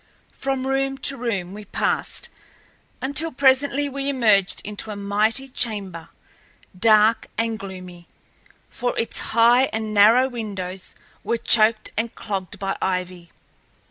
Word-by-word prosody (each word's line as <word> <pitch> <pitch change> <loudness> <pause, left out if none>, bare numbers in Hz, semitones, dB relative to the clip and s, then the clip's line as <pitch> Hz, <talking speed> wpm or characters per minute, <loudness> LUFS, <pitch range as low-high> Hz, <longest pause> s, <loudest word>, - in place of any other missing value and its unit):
From 270 -1 -3
room 270 0 0
to 275 - +2
room 205 -8 -3
we 210 +1 -9
passed - - -2 0.7
until 300 +5 0
presently 280 +1 +2
we 275 0 -3
emerged 215 -8 +3
into 210 +1 -6
a 210 - -4
mighty 210 +6 0
chamber, 205 -10 -2 0.7
dark 215 +2 +4
and 225 -1 -1
gloomy, 185 -3 -10 0.6
for 245 - -3
its 230 - -2 0.2
high 240 +3 +6
and 220 -3 -4
narrow 220 +5 +6
windows 195 -6 -6 0.3
were 235 - 0
choked 220 -1 +3
and 225 +1 -3
clogged 195 -4 -5
by 195 -1 -3
ivy. 180 -2 -3
220 Hz, 125 wpm, -22 LUFS, 195-260 Hz, 0.7 s, high